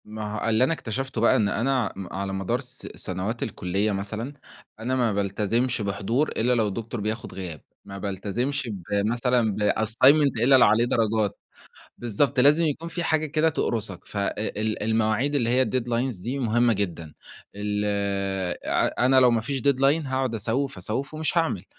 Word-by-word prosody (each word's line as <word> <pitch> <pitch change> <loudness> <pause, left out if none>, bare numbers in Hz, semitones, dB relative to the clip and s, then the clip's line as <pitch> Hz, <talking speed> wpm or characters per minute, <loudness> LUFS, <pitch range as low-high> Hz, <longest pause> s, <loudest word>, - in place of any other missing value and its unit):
ما 105 0 -6
هو - - +1
اللي 110 +2 +3
أنا 135 - +2
اكتشفته 130 -3 -4
بقى 115 - +5
إن 105 -2 +2
أنا 125 -3 0
م 95 -2 -8
على 95 0 -3
مدار 95 +6 -1
س 130 -1 -10
سنوات 95 +6 -3
الكُلّية 100 +1 -1
مثلًا 105 +7 -4 0.5
أنا 125 +4 -1
ما 120 -4 +1
بالتزمش 105 +5 0
بحضور 110 +8 0
إلا 125 +3 +1
لو 110 -3 +2
الدكتور 115 +3 -4
بياخد 110 +2 -3
غياب، 90 -6 -7 0.2
ما 100 - -8
بالتزمش 105 +8 -3 0.2
بمثلًا 115 +1 +1 0.2
بassignment 130 +3 +3
إلا 135 +3 +6
اللي 130 - +7
عليه 110 +3 +4
درجات، 110 -3 0 0.6
بالضبط، 120 +3 +1
لازم 150 +5 +5
يكون 155 +3 -3
في 170 0 -4
حاجة 155 -1 +1
كده 155 +2 +2
تقرُصك. 110 - -2
ف - - -11
أ 100 0 0
ال 110 0 -2
المواعيد 110 +5 +1
اللي 120 -5 +1
هي 130 +2 +4
الdeadlines 120 -2 -1
دي 130 +6 -3
مهمة 120 -1 +2
جدًا، 85 -7 -3 0.4
ال 105 0 -2 0.8
ع - - +1
أنا 130 0 +5
لو 125 -1 +6
ما 115 -1 +2
فيش 135 +4 -3
deadline 140 +4 +2
هاقعد 130 -2 -1
أسوِّف، 130 +6 -2
أسوِّف، 135 +7 -4
ومش 155 +2 0
هاعمل. 160 - -1
115 Hz, 170 wpm, -25 LUFS, 105-130 Hz, 0.8 s, اللي